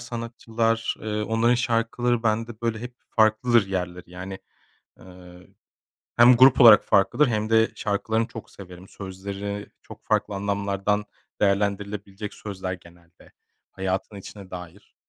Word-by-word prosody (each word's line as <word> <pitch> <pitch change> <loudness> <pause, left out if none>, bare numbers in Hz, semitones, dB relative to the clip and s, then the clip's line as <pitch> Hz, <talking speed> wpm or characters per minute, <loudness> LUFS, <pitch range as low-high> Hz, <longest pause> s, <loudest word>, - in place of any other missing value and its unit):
sanatçılar, 115 -1 -2
eee, 105 0 -3
onların 115 +3 +2
şarkıları 120 0 0
bende 115 0 -1
böyle 115 -1 -1
hep 125 +1 -8
farklıdır 110 0 +3
yerleri 90 -2 -4
yani. 95 +2 -7 0.6
Eee, 90 -1 -15 0.7
hem 120 +1 +7
grup 130 +2 +6
olarak 110 -4 +9
farklıdır 100 +9 +3
hem 110 -1 -1
de 110 0 +4
şarkılarını 110 +2 -1
çok 115 -1 -10
severim. 90 -1 -12
Sözleri 100 +1 -6
çok - - -13
farklı 105 - 0
anlamlardan 100 +1 -1 0.4
değerlendirilebilecek 100 0 -1
sözler; 95 -3 -6
genelde 85 -1 -19 0.4
hayatın 95 +2 -3
içine 100 -1 -11
dair. 90 +2 -11
105 Hz, 120 wpm, -24 LUFS, 95-115 Hz, 0.7 s, olarak